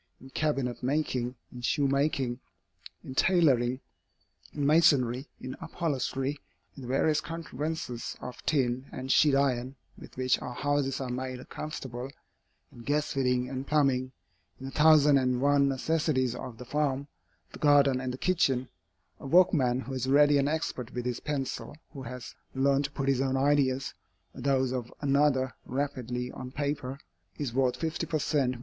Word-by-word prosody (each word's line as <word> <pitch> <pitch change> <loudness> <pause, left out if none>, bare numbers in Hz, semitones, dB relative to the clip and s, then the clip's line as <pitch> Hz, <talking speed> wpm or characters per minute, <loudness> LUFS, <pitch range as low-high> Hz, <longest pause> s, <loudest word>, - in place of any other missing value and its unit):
In 130 +1 -14
cabinet 135 -5 -1
making, 130 -2 -1 0.2
in 125 - -8
shoe 140 +3 +1
making, 135 -3 0 0.6
in 130 - -7
tailoring, 130 -7 +3 0.7
in 145 -2 -2
masonry, 140 -4 +4
in 130 0 -6
upholstery, 145 -4 -2 0.4
in 140 - -10
the 125 - -8
various 150 +4 +2
contrivances 160 -6 -5
of 125 - -8
tin 130 -3 0
and 130 +1 -4
sheet 145 -1 +5
iron 130 -1 +1 0.2
with - - -13
which 130 0 +1
our 125 - -6
houses 145 -1 0
are 130 - -3
made 130 0 -5
comfortable, 130 -4 -6 0.6
in - - -14
gas 145 +5 0
fitting 125 -2 +1
and 130 +1 -5
plumbing, 135 -4 +2 0.5
in 135 - -8
the 135 - -5
thousand 150 -1 +6
and 125 -1 +1
one 140 0 +4
necessities 135 -2 0
of 125 -2 -7
the 125 - -9
farm, 140 0 -1 0.4
the - - -11
garden, 140 -3 +4
and 130 -1 -2
the 125 - -6
kitchen, 135 -8 +1 0.5
a - - -8
workman 135 -7 +4
who 135 - -7
is 130 -1 -2
ready 145 +1 +5
and 140 +1 +2
expert 135 -6 -3
with 125 0 -3
his 125 -1 -2
pencil, 145 0 -4 0.2
who 135 - -7
has 125 -1 -7 0.2
learned 140 +1 +2
to - - -4
put 135 -1 -3
his 135 -1 +2
own 135 0 +1
ideas, 135 -1 +2 0.4
or - - -9
those 130 -1 +2
of 125 -2 -4
another, 140 -2 +2
rapidly 125 -2 -3
on 130 - -7
paper, 140 -1 -3 0.4
is 135 -5 -3
worth 130 -1 +1
fifty 165 0 -2
per 155 - 0
cent. 140 -4 +1
135 Hz, 160 wpm, -29 LUFS, 125-145 Hz, 0.7 s, thousand